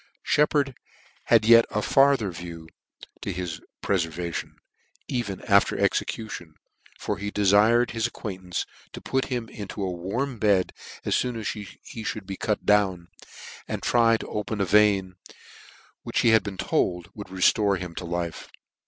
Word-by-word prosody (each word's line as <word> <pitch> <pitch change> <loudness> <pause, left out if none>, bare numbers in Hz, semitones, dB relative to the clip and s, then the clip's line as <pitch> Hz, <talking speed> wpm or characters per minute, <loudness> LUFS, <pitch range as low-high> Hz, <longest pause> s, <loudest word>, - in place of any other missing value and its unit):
Sheppard 145 -2 +2 0.5
had - - +4
yet 115 0 +8
a 105 - -1
farther 135 -7 +4
view 85 -1 -8 0.5
to - - -3
his 85 -2 -5 0.2
prefer 85 -4 +1
vation. 85 +1 -5 0.5
even 105 -7 -3
after 100 -1 +3
execution; 85 -8 -2 0.4
for - - -3
he 105 - -3
defired 105 +4 +4
his 115 0 0
acquaintance 95 -6 -5 0.3
to - - -7
put 135 0 0
him 120 -3 -3
into 100 -1 -6
a 95 - -1
warm 110 +9 -3
bed 100 -4 +2 0.3
as - - +1
foon 125 -1 0
as 110 -2 -3
he 105 -2 -6 0.3
mould 110 -2 -4
be 95 0 -5
cut 105 +2 -2
down, 95 -4 +2 0.6
and - - -4
try 115 -1 +4
to - - -8
open 105 0 -3
a 100 - +2
vein, 95 -1 +3 0.8
which - - -1
he - - +4
had 110 -1 +6
been 100 -2 -6
told 90 -2 -1
would 105 -2 -8
re(lore 95 +2 +3
him 90 -2 -6
to 90 - -6
life. 85 -1 -4
100 Hz, 155 wpm, -25 LUFS, 90-115 Hz, 0.8 s, yet